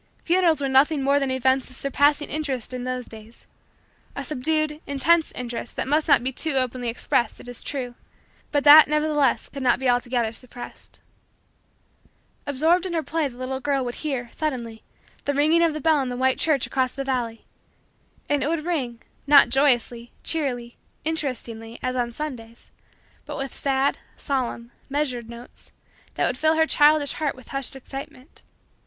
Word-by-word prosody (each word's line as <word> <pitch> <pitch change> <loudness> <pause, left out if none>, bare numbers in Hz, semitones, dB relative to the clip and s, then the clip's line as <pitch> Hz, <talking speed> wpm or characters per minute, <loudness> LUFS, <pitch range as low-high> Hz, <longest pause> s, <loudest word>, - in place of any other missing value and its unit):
Funerals 340 -3 +3
were 275 - -1
nothing 275 +2 +3
more 280 +1 +3
than 275 -1 -1
events 260 0 +1
of 255 - -10
surpassing 285 +2 +2
interest 275 -6 -3
in 250 0 -4
those 255 -1 -3
days 220 +1 -13 0.7
a 280 - -4
subdued, 305 +2 -1
intense, 315 +4 +3
interest 240 -1 -6
that - - -2
must 300 +3 +1
not - - +5
be 260 - -1
too 310 +3 0
openly 255 -2 0
expressed, 230 0 -1
it - - -12
is 245 -1 -7
true, 255 -4 -4 0.6
but 290 -1 +1
that 300 +1 +10
nevertheless 300 -2 +1
could 275 - -8
not 250 -2 +3
be 265 +1 -2
altogether 245 -2 +1
suppressed. 245 +1 -10 1.5
Absorbed 325 +7 +2
in 355 - -5
her 325 -2 0
play 320 -2 -1
the 245 -3 -12
little 260 +1 -4
girl 275 -1 0
would 240 - -3
hear, 270 -6 -3
suddenly, 240 -7 -4 0.4
the 285 - 0
ringing 310 +4 +4
of 335 -1 +4
the 305 - -5
bell 305 0 +3
in 260 - -2
the 245 - -4
white 260 0 +1
church 295 -5 +2
across 260 -2 0
the 275 - -4
valley; 245 -4 -3 0.8
and 290 -1 +1
it - - 0
would 325 -1 -2
ring, 255 -9 -3 0.2
not 280 -3 +7
joyously, 240 -3 +1
cheerily, 245 -7 -2 0.3
interestingly, 235 -7 -4
as 255 0 -1
on 240 -1 -1
Sundays 235 -4 -8 0.6
but - - -5
with 270 -1 -4
sad, 275 0 0 0.2
solemn, 245 -4 -3 0.2
measured, 260 -5 -2
notes, 235 +1 -12 0.4
that - - +1
would 250 - -1
fill 315 +1 +3
her 320 0 +4
childish 295 -2 +4
heart 300 -2 -2
with 255 -2 -15
hushed 275 -1 -2
excitement. 270 +1 -10
270 Hz, 170 wpm, -24 LUFS, 245-300 Hz, 1.5 s, that